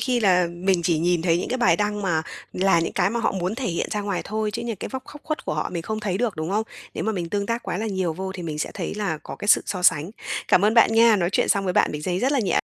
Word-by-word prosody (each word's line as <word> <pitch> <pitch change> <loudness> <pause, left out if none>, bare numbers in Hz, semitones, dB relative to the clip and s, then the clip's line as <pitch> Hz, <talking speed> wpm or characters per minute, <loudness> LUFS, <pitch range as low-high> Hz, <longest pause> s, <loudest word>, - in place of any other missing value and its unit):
khi 250 -2 +1
là 180 -4 +4
mình 175 +1 0
chỉ 165 -2 +2
nhìn 175 0 +1
thấy 170 -1 +2
những - - -3
cái 255 - -1
bài 175 -9 +4
đăng 210 +1 -1
mà 165 -5 +1 0.3
là 185 -2 +3
những 165 - -2
cái 195 +1 +1
mà 235 - -1
họ - - +1
muốn 185 +1 -2
thể 255 +1 -3
hiện 170 -4 -1
ra 210 - -1
ngoài 200 -3 -2
thôi, 215 0 -2
chứ 235 +3 -4
những 230 -2 -3
cái - - -6
vóc 265 -1 -5
khóc 295 - -11
khuất 310 -1 -3
của - - -2
họ 155 - -1
mình 170 -2 -3
không 215 +4 -3
thấy 195 -3 -2
được, 230 -7 -1
đúng 155 +2 -3
hông? 215 +3 +1 0.3
Nếu - - -3
mà 220 - 0
mình 175 -4 -3
tương 200 +2 -1
tác 230 +2 -2
quá - - -3
là 220 - -2
nhiều 190 -5 -1
vô 190 +3 -5
thì 185 -2 -7
mình 155 -3 -4
sẽ - - -2
thấy - - -4
là 200 -7 -2
có - - -8
cái 205 - -6
sự - - +6
so 185 -3 -3
sánh. 160 0 +3 0.4
Cảm 185 - +5
ơn 215 +2 +3
bạn 230 -1 +6
nha, 225 -1 +6
nói 175 -3 +1
chuyện - - +2
xong 200 -1 +2
với 185 - 0
bạn - - +3
mình 150 0 -5
giấy 180 +2 -1
rất 265 +7 +1
là 285 - +2
nhẹ 200 - +1
195 Hz, 325 wpm, -24 LUFS, 175-220 Hz, 0.4 s, sự